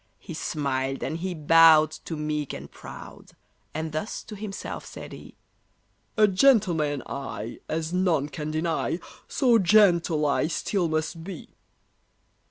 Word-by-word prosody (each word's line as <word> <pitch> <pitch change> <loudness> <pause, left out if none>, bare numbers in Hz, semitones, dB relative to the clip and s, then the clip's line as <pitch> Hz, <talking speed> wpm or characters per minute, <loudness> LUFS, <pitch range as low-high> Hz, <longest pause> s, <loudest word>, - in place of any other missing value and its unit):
He 170 - -9
smiled 135 -4 -2
and 160 - -2
he 185 +1 -3
bowed 155 0 +6
to 165 - -4
meek 150 -1 -2
and - - -8
proud, - - -11 0.4
And 160 +1 -4
thus 155 +8 -4
to 215 - -9
himself 200 -1 -6
said - - -10
he: - - -11 0.8
"A 215 -1 +6
gentleman 185 - +3
I, 135 -5 -6
as 160 +1 -2
none 175 -6 +2
can 150 0 -5
deny, 160 +1 -1 0.3
So 245 -4 +3
gentle 175 -6 +4
I 145 +1 +2
still 175 +2 -1
must 160 +1 -2
be!" 180 -2 -8
160 Hz, 135 wpm, -26 LUFS, 150-185 Hz, 0.8 s, bowed